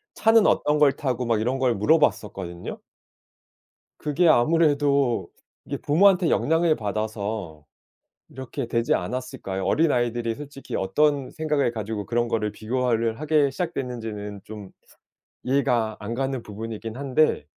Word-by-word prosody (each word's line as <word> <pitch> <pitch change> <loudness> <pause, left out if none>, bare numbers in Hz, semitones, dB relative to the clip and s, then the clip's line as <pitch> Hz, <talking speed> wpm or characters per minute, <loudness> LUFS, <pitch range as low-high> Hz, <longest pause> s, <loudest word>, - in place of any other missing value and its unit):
차는 225 -1 +4
어떤 150 0 +2
걸 145 -2 +6
타고 130 -3 -2
막 115 -2 +1
이런 125 +5 0
걸 125 -3 +2
물어봤었거든요. 100 - 0 1.2
그게 155 +4 +1
아무래도 145 -3 +3 0.4
이게 - - -4
부모한테 180 +3 +4
영향을 160 0 +2
받아서 105 -6 -4 0.6
이렇게 130 -2 -6
되지 115 0 +1
않았을까요? 110 -7 -4
어린아이들이 120 - +1
솔직히 140 0 -7
어떤 140 +7 +1
생각을 150 -5 0
가지고 110 -1 -4
그런 120 +2 0
거를 105 -2 -1
비교를 115 0 -1
하게 150 -2 +2
시작됐는지는 115 - -5
좀 105 -2 -9 0.8
이해가 120 -5 +1
안 105 +2 -5
가는 135 -1 -2
부분이긴 110 +2 -7
한데 140 - +1
125 Hz, 310 characters per minute, -24 LUFS, 110-145 Hz, 1.2 s, 걸